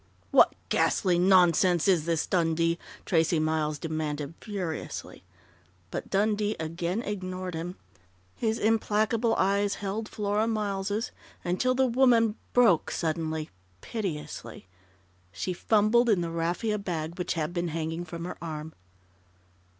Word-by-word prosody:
"What - - +6
ghastly 180 -3 +2
nonsense 180 -2 +4
is 175 -5 +3
this, 165 -2 +1
Dundee?" 165 -1 +1 0.3
Tracey 165 -1 +2
Miles 155 -1 0
demanded 155 -1 -3
furiously. 185 -7 -5 0.7
But - - -5
Dundee 210 +1 +1
again 170 +6 -2
ignored 185 -2 -4
him. 170 +3 -4 0.6
His 225 -1 0
implacable 220 +1 +2
eyes 200 +1 +2
held 210 +2 -4
Flora 210 +1 0
Miles' 210 0 -1 0.3
until 220 +9 +1
the 265 0 +3
woman 240 -3 +4 0.2
broke 230 -10 +4
suddenly, 160 -1 -2 0.3
piteously. 150 - -5 0.7
She 185 - -3
fumbled 220 +5 +3
in 200 -5 +3
the 170 -1 -3
raffia 175 +6 -1
bag 170 -3 -4
which 180 - -1
had 160 +1 -2
been 175 -1 -1
hanging 165 +1 -3
from 170 0 -6
her 180 - -6
arm. 160 -1 -6
180 Hz, 120 wpm, -28 LUFS, 165-210 Hz, 0.7 s, What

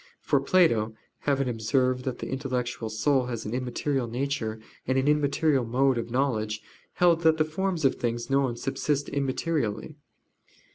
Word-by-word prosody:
For - - +2
Plato, 115 - +3 0.3
having 135 -1 +1
observed 125 +2 0
that 130 -2 -2
the - - -6
intellectual 125 -4 -3
soul 125 +4 +1
has 120 -3 -4
an 105 - -4
immaterial 125 +1 -1
nature, 120 -3 -2 0.3
and 130 +1 +1
an 135 +1 +1
immaterial 150 -1 +2
mode 125 +2 +2
of 115 - -5
knowledge, 110 -4 -1 0.3
held 170 -2 +3
that 160 -1 +4
the 155 - +3
forms 175 0 -1
of 135 - +4
things 120 0 -2
known 135 -3 +1
subsist 140 +2 -1
immaterially. 140 -2 -1
130 Hz, 150 wpm, -27 LUFS, 120-145 Hz, 0.3 s, that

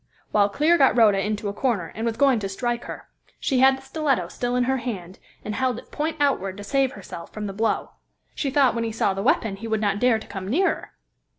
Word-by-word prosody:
Well, 205 -1 +4
Clear 310 +10 +3
got 270 -3 +5
Rhoda 205 -4 +5
into 210 0 -2
a 200 - -2
corner, 210 -7 -1
and 225 +2 -3
was 225 - -2
going 270 -4 +4
to 195 -2 -4
strike 240 +4 -2
her; - - -8 0.3
she 265 - +1
had 265 +1 +6
the 265 - -14
stiletto 270 - 0
still 245 +4 -2
in 250 - +2
her 265 +2 +1
hand, 200 -7 -6 0.3
and 210 - -3
held 255 0 0
it - - -12
point 315 +2 -2
outward 200 -10 +1
to 205 - -7
save 270 +4 +1
herself 180 -4 -9
from 215 -1 -5
the 195 - -4
blow. 220 +3 -1 0.4
She 280 - -2
thought 270 -2 +4
when 230 - -1
he 225 - -2
saw 215 -3 +1
the 195 - -3
weapon 210 -3 +1
he 225 +3 -7
would 220 -1 0
not 205 -1 0
dare 245 -1 +4
to 220 - -9
come 190 -1 -7
nearer. 345 - 0
230 Hz, 240 wpm, -24 LUFS, 205-265 Hz, 0.4 s, had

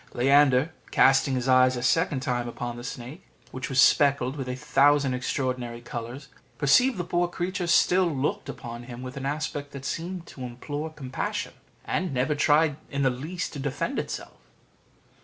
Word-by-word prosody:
Leander, 135 +2 +4 0.2
casting 135 0 +4
his 125 0 -2
eyes 130 0 +5
a 120 - -4
second 150 0 +2
time 125 -3 -1
upon 120 0 -5
the 120 - -8
snake, 125 +7 -8 0.3
which 130 -1 -5
was 135 -1 +1
speckled 140 -2 +4
with 135 -3 -5
a 125 - -2
thousand 145 -1 +3
extraordinary 125 -2 -2
colours, 120 +3 -7 0.3
perceived 245 - +4
the 180 - -2
poor 175 0 0
creature 175 +1 -3
still 180 +2 +4
looked 145 -2 -2
upon 120 -1 -7
him 120 0 -8
with 130 +2 -7
an 135 0 -4
aspect 145 -1 -3
that 140 -1 -8
seemed 175 +3 -4
to 135 - -12
implore 145 +5 -5
compassion, 135 -4 -4 0.3
and 170 -4 -2
never 130 +4 +1
tried 150 0 +3
in 140 -1 -1
the 130 - +3
least 155 +9 -5
to 145 - -6
defend 135 -1 -2
itself. - - -6
135 Hz, 170 wpm, -26 LUFS, 125-150 Hz, 0.3 s, eyes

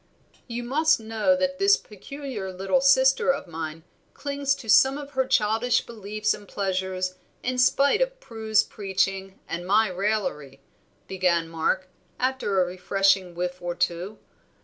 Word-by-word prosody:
"You 240 0 -4
must 305 +5 +2
know 225 +5 +1
that 275 0 -1
this 400 +1 +5
peculiar 215 -1 -7
little 195 +8 0
sister 270 0 +4
of 280 - -4
mine 160 -2 -6 0.3
clings 280 -1 -1
to 235 - -12
some 265 +6 +5
of 285 -1 -8
her 265 -2 0
childish 225 +3 +2
beliefs 215 -1 -2
and 205 - -10
pleasures 185 -1 -2 0.2
in 250 0 -1
spite 280 - +3
of - - -1
Prue's 220 - 0
preaching 195 -1 -2
and 170 +1 -4
my 210 +4 +3
raillery," 180 -8 -2 0.5
began 180 -3 +1
Mark, 165 +3 -1 0.3
after 255 -6 0
a 180 - +4
refreshing 185 0 +1
whiff 180 +1 -3
or 175 0 -3
two. 180 +5 -2
210 Hz, 145 wpm, -25 LUFS, 185-265 Hz, 0.5 s, this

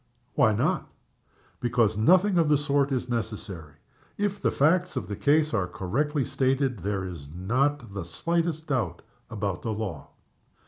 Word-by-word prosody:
"Why - - +4
not?" - - 0 0.7
"'Because 120 -3 +2
nothing 180 - +4
of 160 -3 +3
the 150 - +5
sort 140 -1 +1
is 130 -2 -1
necessary. 105 - -4 0.4
If 205 -1 -1
the - - +3
facts 175 +4 +2
of - - -3
the 100 - -4
case 150 +5 +2
are 100 -5 +1
correctly 135 - -1
stated 135 -3 0
there 100 +1 -2
is 85 -7 -7
not 120 - 0
the 100 -2 -4
slightest 165 - -1
doubt 110 - -2 0.3
about 100 -5 -3
the 110 - -2
law." 100 -9 -5
125 Hz, 150 wpm, -27 LUFS, 100-150 Hz, 0.7 s, the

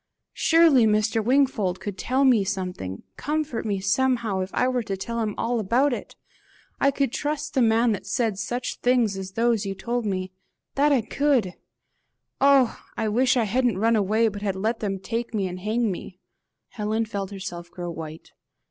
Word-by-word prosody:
Surely 320 -8 +5
Mr. 215 +1 +1
Wingfold 235 -7 +2
could 205 -2 -5
tell 260 +6 +1
me 240 -6 +5
something 180 - -4
comfort 300 -6 -2
me 200 -2 -1
somehow, 230 0 +1
if 185 0 -2
I 250 - +1
were 255 -1 0
to 195 -3 -4
tell 230 +5 -4
him 215 -2 -2
all 235 +1 0
about 245 +7 +2
it! - - -6 0.6
I 275 - +4
could 275 -2 0
trust 300 0 -3
the 265 - +2
man 230 0 +3
that 205 - -4
said 220 -5 0
such 240 +4 -3
things 245 -5 +2
as 190 0 -6
those 230 -1 +1
you 195 -1 -4
told 235 +3 -2
me. 185 -2 -2 0.4
That 290 +2 +3
I 270 -4 +4
could! 250 -5 +1 0.9
Oh! 275 -3 +4 0.2
I 220 - 0
wish 250 +4 +3
I 235 - +3
hadn't 240 0 +1
run 225 +3 +3
away, 215 +2 +2
but 205 -1 -4
had 200 -2 -1
let 220 +4 -1
them 195 -2 -2
take 230 +4 -4
me 195 -3 0
and 180 0 -6
hang 215 +3 0
me!" 185 0 -8 0.5
Helen 220 +1 -1
felt 200 -3 -4
herself 185 -3 -7
grow 175 0 -6
white. 160 -1 -8
220 Hz, 185 wpm, -25 LUFS, 195-250 Hz, 0.9 s, Surely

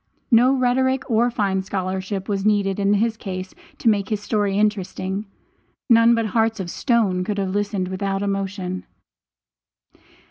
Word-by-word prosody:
No 245 +3 +6
rhetoric 260 +1 +1
or 230 +2 +3
fine 200 -5 0
scholarship 190 0 -3
was 195 -2 -1
needed 205 -2 +1
in 200 +1 +3
his 225 +2 +1
case 185 -3 -6 0.2
to - - -3
make 205 -3 +2
his 215 -2 -1
story 205 -2 0
interesting. 200 -1 -1 0.6
None 230 0 +6
but 230 -1 0
hearts 225 +1 +1
of 175 -3 -4
stone 215 -8 +1
could 205 +2 -3
have 195 -1 -1
listened 205 -2 -1
without 195 +1 -2
emotion. 195 -2 -3
200 Hz, 145 wpm, -22 LUFS, 190-225 Hz, 0.6 s, No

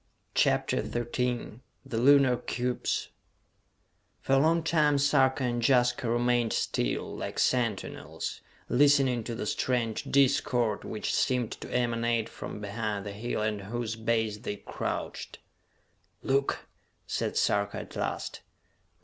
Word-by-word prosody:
CHAPTER - - +2
XIII 120 -1 -2 0.3
The 120 -4 -2
Lunar 135 0 +6
Cubes 125 +1 -2 1.1
For 135 - -1
a 135 - +6
long 165 +3 +3
time 150 -3 +3
Sarka 135 -1 +3
and 120 -1 0
Jaska 120 -1 +3
remained 120 -1 +2
still, - - -1
like - - -5
sentinels, 115 -6 -1 0.3
listening 135 -3 +4
to 120 - -4
the 110 - -4
strange 115 0 -1
discord 130 -5 +2
which 110 - -3
seemed 125 -3 +1
to - - -8
emanate 120 -2 0
from - - -7
behind 105 -1 -3
the 100 - -4
hill 110 +1 -3
at 105 -2 -1
whose 115 +2 -3
base 110 -2 0
they 105 -3 -4
crouched. - - -5 0.9
"Look!" 135 +1 +1 0.4
said - - -2
Sarka 100 0 +1
at - - -12
last. - - -3
120 Hz, 125 wpm, -29 LUFS, 110-130 Hz, 1.1 s, Lunar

